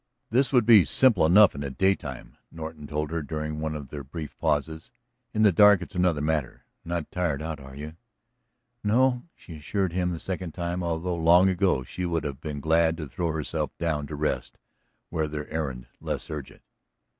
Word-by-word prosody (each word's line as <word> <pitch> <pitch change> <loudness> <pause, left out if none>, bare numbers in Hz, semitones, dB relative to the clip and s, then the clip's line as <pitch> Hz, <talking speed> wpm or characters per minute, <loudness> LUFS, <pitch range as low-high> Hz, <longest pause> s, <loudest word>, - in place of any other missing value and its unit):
"This 130 +3 +2
would 125 -5 +4
be 110 -4 +8
simple 100 - +4
enough 100 +4 +7
in 70 - -6
the 70 - -3
daytime," 75 -4 -1 0.2
Norton 80 -2 -8
told 75 0 -3
her 85 -1 -1
during 75 +1 -4
one 80 0 -3
of 70 -3 -7
their 70 -1 -6
brief 75 +3 -7
pauses. 80 +4 -1 0.4
"In 110 - +1
the 105 - +6
dark 100 0 +6
it's 100 - -12
another 90 -5 +1
matter. 75 -4 -2 0.2
Not 85 -2 -4
tired 85 -6 -1
out, 80 0 -5
are 65 -1 -11
you?" 75 +3 -8 0.9
"No," 125 +4 +2
she 80 -3 -11
assured 95 +4 -2
him 90 0 0
the 85 -2 -4
second 90 -3 -5
time, 85 0 -2
although 85 +1 -2
long 85 +3 +5
ago 90 -7 +1
she 90 +8 -6
would 85 -1 -1
have 70 -3 -5
been 75 -2 -5
glad 80 +2 +2
to 80 -4 -5
throw 85 +3 -2
herself 80 -1 -3
down 75 -3 -1
to 75 - -6
rest, 75 +1 -2 0.5
were 80 -2 0
their 75 0 -5
errand 70 -6 -3
less - - -4
urgent. 75 -4 -8
80 Hz, 190 wpm, -26 LUFS, 75-90 Hz, 0.9 s, be